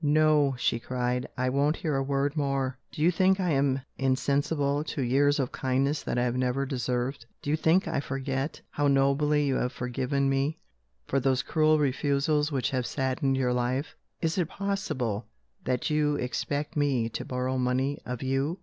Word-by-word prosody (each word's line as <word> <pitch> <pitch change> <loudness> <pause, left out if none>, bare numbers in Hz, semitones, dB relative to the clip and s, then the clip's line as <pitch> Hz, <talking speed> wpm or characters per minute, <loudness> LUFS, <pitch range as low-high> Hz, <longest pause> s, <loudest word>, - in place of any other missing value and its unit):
"No," 150 -2 +4
she 115 - +1
cried, 125 0 -2
"I 130 0 +1
won't 140 +4 +2
hear 155 -4 -2
a 135 - +1
word 140 +1 0
more! 135 -3 -1
Do 150 - -3
you 175 - +5
think 190 +2 +3
I 180 -3 +1
am 135 -1 +2 0.2
insensible 140 +2 +1
to 145 - -3
years 140 +4 +3
of 135 -3 -1
kindness 135 +3 0
that - - -3
I 120 - +2
have 125 0 0
never 130 +2 0
deserved? 125 -1 -2 0.2
Do 145 - -1
you - - +4
think 165 +4 +2
I - - 0
forget 135 +1 -3
how 145 0 +1
nobly 140 +2 +3
you 135 -2 +1
have 125 - -1
forgiven 130 +3 -1
me 135 +3 0 0.5
for 135 - +1
those 130 0 +1
cruel 155 -1 +3
refusals 145 +2 +1
which 135 0 0
have 125 -2 -1
saddened 135 0 0
your 125 -2 +1
life? 125 +4 -1 0.3
Is 165 +3 +1
it 175 -2 0
possible 190 - -2 0.4
that 125 +3 0
you 150 -1 +2
expect 145 +3 -2
me 140 -6 +1
to - - -5
borrow 130 0 -2
money 130 +3 0
of 125 0 -5
You?" 135 +6 0
135 Hz, 180 wpm, -28 LUFS, 130-150 Hz, 0.5 s, you